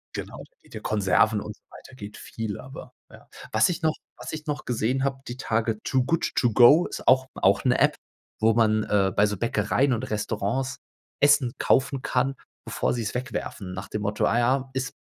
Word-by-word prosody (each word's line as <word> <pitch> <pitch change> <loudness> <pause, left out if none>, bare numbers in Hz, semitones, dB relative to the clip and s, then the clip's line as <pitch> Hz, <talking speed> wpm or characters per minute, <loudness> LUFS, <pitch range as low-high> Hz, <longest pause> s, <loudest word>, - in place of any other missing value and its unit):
Genau, - - -6 0.2
mit - - -19
den - - -7
Konserven 105 +1 +2
und 105 - -7
so - - -40
weiter - - -14
geht 105 -3 -9
viel, 110 -2 -6
aber, 130 +1 -11 0.2
ja. - - -16 0.2
Was 110 0 +4
ich 175 - -3
noch 160 -1 +2 0.2
was - - -7
ich 155 -1 -7
noch 150 0 -3
gesehen 125 +2 -1
habe, 135 -1 -2
die 120 - -5
Tage: 115 -3 -1
„Too 130 -1 +1
Good 165 +4 0
To 120 - +2
Go“ 135 +9 +7
ist - - -7
auch 130 +1 +5
auch - - +2
'ne - - +3
App, - - +3 0.4
wo 110 +1 +4
man, 110 -1 +2
äh, 100 -2 +1
bei 100 - +4
so 105 0 -1
Bäckereien 115 +5 +1
und 120 -1 -1
Restaurants 110 +5 -2 0.4
Essen 145 -3 +4
kaufen 135 0 +1
kann, 130 +2 0 0.3
bevor - - -1
sie 120 - -2
es 105 - -3
wegwerfen. 125 -6 -5
Nach 95 +1 -7
dem 105 - -4
Motto, 105 +1 0
ah 120 - +2
ja, 130 +2 +1
ist 130 -1 -3
120 Hz, 205 wpm, -25 LUFS, 105-135 Hz, 0.4 s, Go